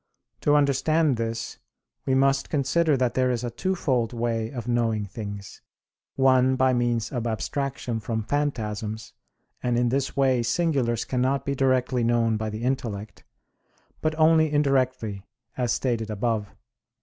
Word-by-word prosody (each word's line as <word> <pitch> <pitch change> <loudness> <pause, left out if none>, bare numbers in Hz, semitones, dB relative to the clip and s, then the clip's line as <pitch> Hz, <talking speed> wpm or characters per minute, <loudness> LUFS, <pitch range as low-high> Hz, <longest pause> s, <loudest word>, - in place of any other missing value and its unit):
To 145 - +3
understand 145 0 +2
this, 115 0 -4 0.5
we 130 - +3
must 135 0 +2
consider 150 +1 +2
that 125 -2 +1
there 130 -1 +2
is 125 -1 -1
a 120 - -3
twofold 130 -6 -1
way 115 -1 -1
of 120 -2 -6
knowing 115 -3 0
things, 100 -1 -8 0.5
one 130 -1 +4
by 130 0 +3
means 120 -2 0
of 120 -3 -2
abstraction 125 +1 -3
from 110 +1 -3
phantasms, 110 -5 -3 0.5
and 120 -1 0
in 120 0 +2
this 135 +2 -1
way 130 -3 +3
singulars 120 -2 0
cannot 130 +2 0
be 140 - 0
directly 130 -2 +1
known 115 -1 +2
by 110 0 -2
the 110 +2 -6
intellect, 115 -5 -3 0.8
but 155 0 -1
only 160 -1 +4
indirectly, 130 -8 +1 0.3
as 125 -2 0
stated 115 -4 -1
above 110 0 -1
(Q. - - -25
125 Hz, 145 wpm, -25 LUFS, 115-135 Hz, 0.8 s, one